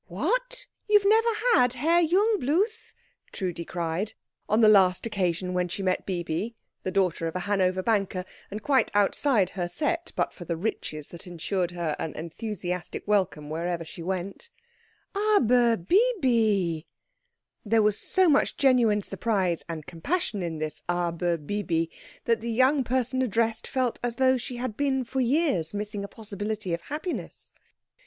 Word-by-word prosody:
"What! - - -2 0.2
You 420 - +8
have 400 -1 +1
never 450 +2 +5 0.2
had 250 - +4
Herr 325 +7 +3
Jungbluth?" 395 - +1 0.4
Trudi 175 -3 -3
cried, 175 +5 -3 0.4
on 215 +2 +3
the 220 - +7
last 190 -3 +5
occasion 185 -4 -1
on - - -3
which 180 0 -1
she 195 - -3
met 185 -1 0
Bibi, 180 +4 -2 0.3
the - - -3
daughter 180 -3 +1
of 165 - -5
a 185 - -1
Hanover 185 -1 +1
banker, 195 -4 0 0.2
and 210 +2 -6
quite 270 -3 +3
outside 205 -1 +3
her 180 -2 -3
set 315 - -2
but - - 0
for 175 - -9
the 170 -1 -3
riches 155 -6 -3
that 170 +2 -9
ensured 175 +1 -2
her 170 -4 -2
an 160 - -4
enthusiastic 180 +2 -5
welcome 190 -8 +1
wherever 170 +1 -2
she 165 - -10
went, 190 - -4 0.6
"aber 250 - +3
Bibi!" 220 - +2 0.8
There 220 0 +3
was 210 -1 +2
so 375 -1 +3
much 295 -3 +3
genuine 240 -7 +3
surprise 190 -8 0
and 160 -3 -5
compassion 210 - -2
in 165 -2 -3
this 155 0 -4
"aber 175 0 0
Bibi" 165 0 -2 0.3
that 230 -1 +2
the 235 - -4
young 260 +4 +3
person 255 +1 0
addressed 225 -2 0
felt 255 -3 -1
as 240 -1 -2
though 260 0 +4
she 250 +1 -6
had 240 -3 -4
been 270 -1 +1
for 260 +2 -2
years 245 - +1
missing 205 0 -3
a - - -4
possibility 205 -2 -4
of 170 - -2
happiness. 310 - -5
210 Hz, 160 wpm, -27 LUFS, 175-260 Hz, 0.8 s, You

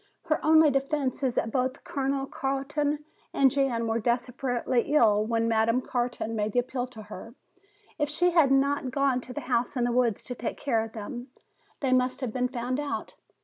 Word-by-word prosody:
"Her 315 -1 0
only 315 -1 +6
defense 275 -1 -1
is 255 -3 0
that 225 - 0
both 255 +2 -1
Colonel 270 0 -1
Carton 285 +2 -2 0.3
and 270 -2 +5
Jan 255 -4 +1
were 225 0 0
desperately 245 +1 0
ill 215 -6 +5
when 230 0 +1
Madame 225 +2 +2
Carton 245 -3 -2
made 210 -1 -1
the 245 - +3
appeal 250 0 -2
to 225 -4 -11
her. 215 +3 -10 0.6
If 295 -1 +1
she 355 +4 +2
had 325 -5 +5
not 270 0 +2
gone 265 -1 +1
to 250 - -10
the 295 - -5
house 245 +1 -1
in 245 - +1
the 240 - +1
woods 235 -3 +1
to 250 - -6
take 240 -1 -4
care 230 -6 0
of 225 - -8
them, 240 +3 -6 0.5
they 265 -2 +2
must 255 +1 +1
have 255 -4 -2
been 250 +1 0
found 250 +1 -3
out. 290 -1 -4
255 Hz, 190 wpm, -27 LUFS, 235-275 Hz, 0.6 s, only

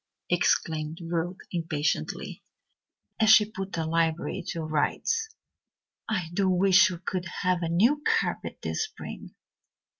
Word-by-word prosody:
exclaimed 155 0 +1
Ruth 170 +1 -3
impatiently, 165 -3 -2 0.8
as 220 -1 +4
she 215 -1 +8
put 195 -2 -7
the 165 -1 -1
library 165 0 0
to 165 - -3
rights. 155 - 0 0.8
"I 180 -7 -2
do 190 +1 +2
wish 190 +2 +5
we 180 - -5
could 185 -1 -2 0.2
have 180 -1 +2
a 165 - -1
new 235 - +3
carpet 455 0 -1
this - - -1
spring. 435 - -10
180 Hz, 125 wpm, -27 LUFS, 165-205 Hz, 0.8 s, she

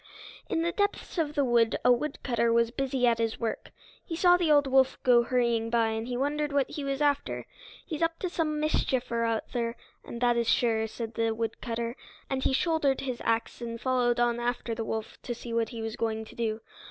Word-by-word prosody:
In 325 - 0
the 340 - +1
depths 405 -2 -1
of 300 -2 -1
the 285 -2 +2
wood 235 -2 +3
a 250 - +7
woodcutter 245 -3 0
was 230 0 +3
busy 265 -1 0
at 235 -1 +3
his 225 -1 -1
work. 230 -1 -3 0.3
He 330 - -5
saw 355 +1 +5
the 345 -3 +2
old 290 -1 +5
wolf 265 0 +3
go 245 -3 +6
hurrying 235 -2 +1
by, 230 -1 +2
and 220 +1 -3
he 245 -1 -2
wondered 295 +2 0
what 280 -2 +1
he 290 - -4
was 275 +1 -1
after. 285 -1 0 0.4
"He's 315 -4 -5
up 330 0 +1
to 370 - -2
some 315 -3 -1
mischief 260 -5 0
or 230 0 +1
other, 230 +1 -2 0.3
and 235 - -7
that 240 -1 +3
is 235 -1 +1
sure," 220 -2 +2
said 225 +1 -6
the 225 0 0
woodcutter. 230 +1 -3 0.4
And 265 -1 0
he - - +2
shouldered 285 -1 +1
his 255 -3 -4
axe 230 +1 -1
and 230 -1 -5
followed 250 -2 +1
on 240 0 +2
after 240 -1 -2
the 225 0 -3
wolf 220 0 -5
to 240 - -4
see 235 0 -7
what 230 -1 +1
he 230 -2 -6
was 225 0 -4
going 220 -1 -2
to - - -14
do. 225 -1 -2
240 Hz, 215 wpm, -28 LUFS, 230-280 Hz, 0.4 s, a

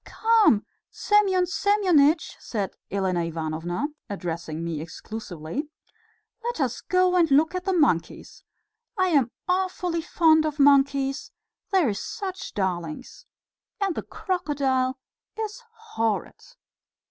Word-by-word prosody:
"Come, 440 - +3 0.2
Semyon 395 -4 +2
Semyonitch," 355 -6 +3
said 205 -4 -3 0.2
Elena 190 -3 0
Ivanovna, 165 - -3 0.2
addressing 170 -4 -4
me 165 -3 -3
exclusively, 180 - -6 0.7
"let 480 -3 -3
us 255 -4 -1
go 365 0 +2
and 340 -3 +4
look 300 +5 +4
at 365 0 -4
the 385 - +1
monkeys. 290 - 0 0.5
I 370 -1 +2
am 280 -8 +3 0.2
awfully 360 -2 0
fond 320 -1 +4
of 305 -1 -2
monkeys; 275 0 +3 0.4
they 380 -3 +4
are 235 -8 +1
such 380 - -6
darlings... 180 0 -4 0.5
and 395 -3 0
the - - -3
crocodile 275 -7 -1 0.4
is 440 +2 -4
horrid." 230 - -3
290 Hz, 110 wpm, -25 LUFS, -, 0.7 s, and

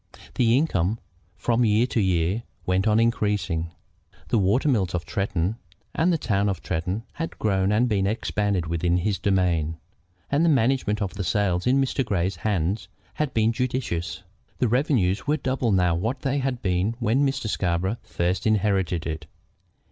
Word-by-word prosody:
The 120 0 +3
income 110 - +1 0.4
from 120 0 +1
year 110 +1 +3
to 125 - -1
year 90 +2 +1 0.2
went 95 +3 +1
on 110 0 +4
increasing. 105 -7 0 0.6
The 115 - +3
water 105 +10 +2
mills 95 -10 +1
of 85 - -3
Tretton 95 +1 -1 0.4
and 175 +3 +2
the 170 - +2
town 105 -7 0
of 95 -4 -4
Tretton 90 +7 -2
had 165 +1 -5
grown 95 -2 +1
and 115 +4 +3
been 100 -4 +1
expanded 100 -4 -1
within 85 +1 0
his 100 +2 -1
domain, 85 -5 +1 0.5
and 145 +3 +3
the 170 - +4
management 120 -6 +2
of 95 - -4
the 95 - -4
sales 90 0 0
in 130 +2 +4
Mr. 135 0 +1
Grey's 95 -5 -1
hands 95 -1 -1 0.3
had 150 -3 -1
been 110 +1 +3
judicious. 115 -9 -2 0.3
The 125 - +2
revenues 120 - +1
were 150 +2 +2
double 130 -5 -1
now 90 -3 +3
what 110 +11 -2
they 140 0 0
had 130 -2 -2
been 95 +4 0
when 120 +3 +1
Mr. 135 -2 -1
Scarborough 95 +2 0
first 90 +4 -1
inherited 95 -5 +1
it. 80 -1 -5
105 Hz, 165 wpm, -25 LUFS, 90-120 Hz, 0.6 s, on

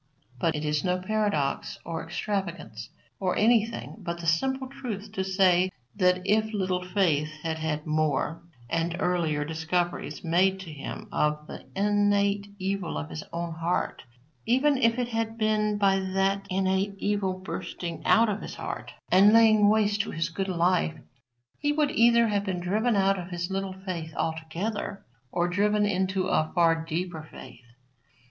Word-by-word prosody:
But 165 +3 +1
it 150 +1 -3
is 150 0 0
no 180 -1 +1
paradox 185 -7 -1
or 165 -1 -4
extravagance 175 - -4 0.3
or 185 -2 0
anything 225 0 +2
but 170 -3 -4
the 170 - -7
simple 265 +11 +1
truth 235 -7 -6
to 190 -3 -2
say 185 -1 +3 0.3
that 180 -2 +2
if 215 +2 +2
Little 185 -2 0
Faith 175 -6 +1
had 160 -1 -2
had 155 -1 -2
more 155 +1 0 0.3
and 165 +3 -1
earlier 160 -5 0
discoveries 160 -1 -2
made 185 +3 +2
to 170 -4 -8
him 140 - -7
of 150 0 0
the - - -10
innate 205 0 +2
evil 190 -2 -2
of 75 +1 -5
his 80 - -5
own 170 0 -3
heart, 165 +2 -1 0.5
even 275 +4 +4
if 230 -1 +3
it 245 -1 -1
had 225 -1 -2
been 215 -1 +1
by 195 -1 +3
that 195 +1 0
innate 190 +1 0
evil 200 -2 0
bursting 170 -3 -6
out 230 +1 +5
of 210 -1 -2
his - - -7
heart - - -6 0.2
and 195 +3 +7
laying 215 -2 +6
waste 210 -1 +3
his 165 +1 -2
good 190 +3 -3
life, 175 -2 +2 0.6
he 290 0 +1
would 295 -1 +1
either 235 -3 +5
have 205 -2 0
been 190 -3 -2
driven 215 +6 +1
out 195 -1 +3
of 175 - -6
his 175 +1 -4
little 195 0 -2
faith 165 -4 -4
altogether 165 +6 -3 0.3
or 175 0 +1
driven 210 +3 +2
into 190 -1 0
a 155 -4 +1
far 170 -2 +5
deeper 165 0 -3
faith. 125 -2 -12
190 Hz, 160 wpm, -27 LUFS, 165-205 Hz, 0.6 s, and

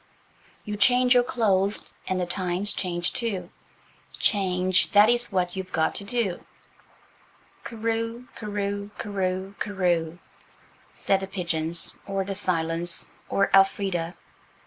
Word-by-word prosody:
"You 210 0 -4
change 250 +3 +5
your 245 - +6
clothes 205 -5 0
and 185 0 0
the 180 - 0
times 185 +2 +2
change 175 -1 -1
too– 225 -6 -3 0.7
Change, 185 -2 +1
that 205 +2 +7
is 240 -1 +2
what 180 -2 0
you've 190 -1 -5
got 160 0 +1
to - - -1
do; 205 -4 -1 1.2
Cooroo, 230 +1 -3
cooroo, 205 -1 -3
cooroo, 190 -1 -2
cooroo," 175 -5 0 0.8
said 195 - +1
the 195 - -5
pigeons 170 -3 -1
or 195 -1 -1
the 195 +1 -4
silence 170 -3 -1 0.2
or 195 - +1
Elfrida. 195 -3 +2
195 Hz, 120 wpm, -26 LUFS, 180-210 Hz, 1.2 s, that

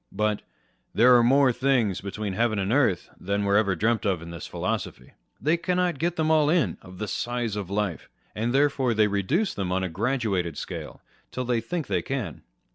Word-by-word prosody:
But 105 -1 0 0.3
" - - -41
there 125 +2 +7
are 120 - +6
more 130 +1 +4
things 125 -7 +1
between 100 0 -4
heaven 115 +1 +1
and 100 +2 0
earth 130 -10 +1
than 100 +2 -1
were 100 0 +2
ever 100 -3 +3
dreamt 110 +5 +1
of 95 -5 +1
in 85 - -8
this 85 0 -7
philosophy." 65 - -4 0.3
They 155 +6 +2
cannot 180 -3 0
get 170 +1 0
them 160 -1 +1
all 155 -2 +4
in, 165 -4 +1
of 95 -1 -13
the 110 - -4
size 120 -1 -2
of 100 -4 -4
life, 100 -6 -2 0.2
and 115 +3 -1
therefore 135 -3 +2
they 110 0 +4
reduce 105 - 0
them 95 -3 -3
on 95 +1 0
a 95 - -1
graduated 100 - -1
scale, - - -7 0.3
till 125 - -4
they 120 -2 +1
think 160 +7 -3
they 95 -6 0
can. 110 - -4
110 Hz, 200 wpm, -26 LUFS, 100-135 Hz, 0.3 s, there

